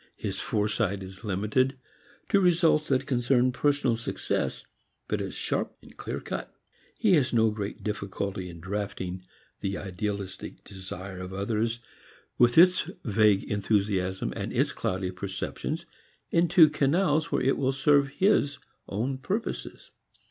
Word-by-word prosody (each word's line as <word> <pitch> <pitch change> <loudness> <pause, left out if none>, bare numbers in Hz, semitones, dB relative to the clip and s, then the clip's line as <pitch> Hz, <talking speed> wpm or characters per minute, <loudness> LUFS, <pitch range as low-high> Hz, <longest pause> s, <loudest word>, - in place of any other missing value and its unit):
His - - -4
foresight 105 -2 0
is 95 +2 -10
limited 110 +7 +1 0.5
to 200 - +5
results 170 -4 +3
that 130 -1 +1
concern 125 0 +2
personal 140 -1 +2
success, 115 - -2 0.4
but - - -1
is - - -5
sharp, - - -2 0.2
clearcut. - - -5 0.5
He 210 -4 +3
has 135 -6 +3
no 110 -1 +4
great 105 -1 -5
difficulty 100 -3 -3
in 85 -1 -10
drafting 95 -1 -4 0.4
the 100 0 -2
idealistic 100 +1 -5
desire 95 -1 -8
of 90 0 -6
others 110 +4 -1 0.6
with 120 +2 +5
its 180 +2 +6 0.2
vague 105 -2 +4
enthusiasms 100 -2 0
and - - -4
its - - +1
cloudy 95 0 -2
perceptions 95 +1 -4 0.5
into 170 -1 +6
canals 155 +1 +2
where - - +1
it 135 - +3
will 135 -1 +2
serve 140 +1 +4
his 145 -2 +2 0.3
own 125 +7 -2
purposes. 205 - -4
110 Hz, 125 wpm, -28 LUFS, 100-140 Hz, 0.6 s, its